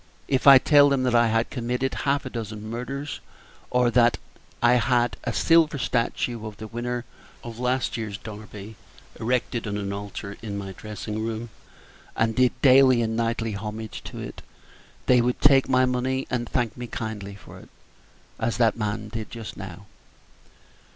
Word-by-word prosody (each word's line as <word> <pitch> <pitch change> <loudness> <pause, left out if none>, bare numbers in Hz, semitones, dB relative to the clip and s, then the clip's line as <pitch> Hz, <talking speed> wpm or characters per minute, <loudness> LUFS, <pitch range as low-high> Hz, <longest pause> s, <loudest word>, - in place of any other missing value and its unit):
If 130 0 +1
I 135 -1 +11
told 145 +1 +5
them 135 -2 +2
that 125 -1 +1
I 120 0 +5
had 115 +1 0
committed 125 +1 -2
half 140 0 0
a 130 - -5
dozen 110 -2 -6
murders, 130 +5 -5 0.5
or 125 -1 +2
that 120 0 +4 0.4
I 120 0 +5
had 120 +1 +2
a - - 0
silver 165 -3 +3
statue 120 -2 -1
of 105 - -9
the 110 - -7
winner 120 +2 -4 0.4
of 115 -1 -8
last 125 0 0
year's 105 -3 -4
Derby 105 0 -10 0.4
erected 120 0 -1
on 105 0 -2
an 100 -1 -3
altar 100 0 -6
in 105 -3 -5
my 100 -1 -5
dressing 105 +2 -6
room, 115 0 -4 0.6
and 115 0 +1
did 125 0 +2
daily 130 -3 +6
and 110 0 -1
nightly 115 -1 -1
homage 110 +2 -6
to - - -8
it, - - -7 0.6
they 125 -1 +5
would 125 +1 0
take 135 -2 +5
my 130 0 +4
money 130 +1 -1
and 120 -2 -2
thank 120 -4 -1
me 120 -1 -6
kindly 105 -4 -5
for 100 - -13
it, - - -16 0.7
as 115 +1 -1
that 115 -2 +3
man 105 -1 -3
did 110 0 -5
just 115 -2 -8
now." 95 0 -9
115 Hz, 170 wpm, -25 LUFS, 110-125 Hz, 0.7 s, I